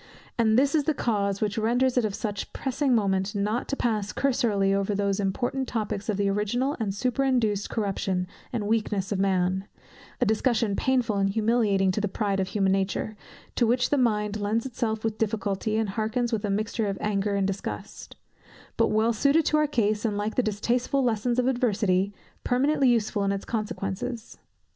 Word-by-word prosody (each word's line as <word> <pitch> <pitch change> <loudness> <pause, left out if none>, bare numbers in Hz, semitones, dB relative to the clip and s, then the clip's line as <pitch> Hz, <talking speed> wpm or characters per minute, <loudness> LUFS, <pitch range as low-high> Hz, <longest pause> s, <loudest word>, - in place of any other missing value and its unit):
And 220 -1 +3
this 275 +2 +3
is 300 -3 +2
the 310 - +1
cause, 200 -5 0
which 210 0 0
renders 245 +4 +2
it 245 -3 +3
of 205 -2 -2
such 205 -3 -4
pressing 265 -1 0
moment 195 -2 0
not 210 +4 -1
to 275 - -2
pass 215 -6 -1
cursorily 220 -8 +1
over 200 +1 0
those 200 0 0
important 245 +7 -1
topics 210 -2 -3
of 210 - 0
the 200 -1 +1
original 215 +8 0
and 215 -3 -1
superinduced 240 -2 0
corruption, 195 -4 -1 0.3
and 225 -4 -2
weakness 210 -3 0
of 200 - 0
man; 190 0 +1 0.5
a 250 - +3
discussion 220 -1 +1
painful 250 -4 +1
and 195 0 +2
humiliating 210 -3 +2
to 210 - -1
the 205 - 0
pride 200 0 -1
of 190 - 0
human 195 -1 +1
nature, 195 +2 -1 0.4
to 235 - +2
which 250 +2 +1
the 290 - +3
mind 210 -3 0
lends 215 +4 0
itself 230 -4 -2
with 220 -1 -2
difficulty, 215 -1 -1
and 220 -2 0
hearkens 220 +4 -1
with 220 -1 -1
a 205 - -1
mixture 215 +2 -1
of 195 - -2
anger 205 -1 0
and 200 -1 +1
disgust; 190 - -5 0.6
but - - +4
well 220 +2 +2
suited 280 +7 +3
to 305 - +3
our 305 0 +3
case, 215 -6 0
and 210 -3 0
like 210 +1 -2
the - - +2
distasteful 240 +5 0
lessons 235 0 0
of 250 - +2
adversity, 210 -7 +1 0.3
permanently 270 +2 +2
useful 215 -3 +1
in 200 - +1
its 200 0 -3
consequences. 220 +1 -4
215 Hz, 185 wpm, -26 LUFS, 200-240 Hz, 0.6 s, but